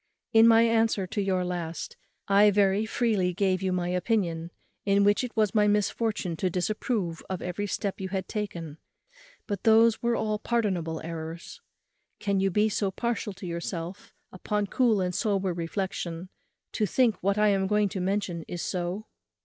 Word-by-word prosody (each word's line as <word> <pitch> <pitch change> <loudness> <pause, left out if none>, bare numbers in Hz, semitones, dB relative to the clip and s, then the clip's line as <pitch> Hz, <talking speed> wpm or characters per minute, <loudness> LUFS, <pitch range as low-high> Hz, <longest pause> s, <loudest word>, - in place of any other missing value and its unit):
In 225 0 +7
my 230 0 +7
answer 225 -3 +2
to 205 +3 -3
your 185 -2 0
last, 170 -3 -4 0.3
I 200 +1 +6
very 200 +1 +2
freely 210 -7 +1
gave 190 -1 +1
you 190 -1 0
my 180 -1 -1
opinion, 180 -3 0 0.3
in 200 0 +3
which 205 +4 +3
it 245 -2 -6
was 215 -3 +2
my 210 -1 +4
misfortune 205 -3 0
to 185 - 0
disapprove 185 -1 -2
of 185 -2 -3
every 180 +3 -3
step 200 -1 -3
you 190 - -3
had 190 -1 -3
taken; 170 -8 -5 0.7
but 205 -2 -3
those 225 0 +5
were 235 0 +1
all 215 -2 -1
pardonable 185 -9 -1
errors. 165 0 -7 0.6
Can 200 -2 0
you 195 0 +2
be 210 +3 +2
so 205 -2 0
partial 225 0 -2
to 190 0 -10
yourself, 170 +2 -5 0.2
upon 210 +3 -2
cool 220 -1 +2
and 180 0 -1
sober 195 -3 0
reflexion, 170 0 -4 0.4
to 210 - 0
think 235 +2 +3
what 200 +2 +1
I 210 0 +4
am 195 -1 +1
going 210 0 +2
to 190 - -4
mention 185 -3 -1
is 175 - -5
so? 180 +3 -3
195 Hz, 170 wpm, -27 LUFS, 180-210 Hz, 0.7 s, In